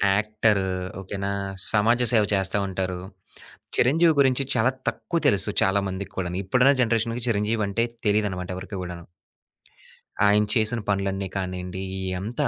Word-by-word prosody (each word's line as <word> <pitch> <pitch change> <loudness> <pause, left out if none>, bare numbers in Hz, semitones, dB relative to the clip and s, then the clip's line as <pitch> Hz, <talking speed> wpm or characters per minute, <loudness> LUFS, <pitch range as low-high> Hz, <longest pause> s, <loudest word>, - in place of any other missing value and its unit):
Actor 105 -1 +1 0.4
okay 95 +1 -6
నా? 100 - -1 0.4
సమాజ 110 +3 +3
సేవ 110 -2 +5
చేస్తా 95 +1 +1
ఉంటారు. 95 -1 -3 0.8
'చిరంజీవి' 160 +5 +4
గురించి 130 0 +3
చాలా 125 +4 +3 0.2
తక్కువ 170 - -2
తెలుసు 100 +1 +3
చాలా 95 +1 +3
మందికి 95 +1 -6
కూడాను 90 -1 -3
ఇప్పుడున్న 125 +8 +4
జనరేషన్‌కి 115 +1 0
'చిరంజీవి' 105 0 0
అంటే 115 +4 0 0.2
తెలిదన్నమాట 100 -4 0
ఎవరికి 95 +2 -7
కూడాను. 90 -1 -7 1.2
ఆయన 105 +1 +4
చేసిన 110 +1 +1
పనులన్నీ 95 -1 -1
కానియండి 90 -1 -4
ఇయ్యి 95 -1 -3
అంతా, 120 +8 -1
105 Hz, 135 wpm, -24 LUFS, 95-115 Hz, 1.2 s, సేవ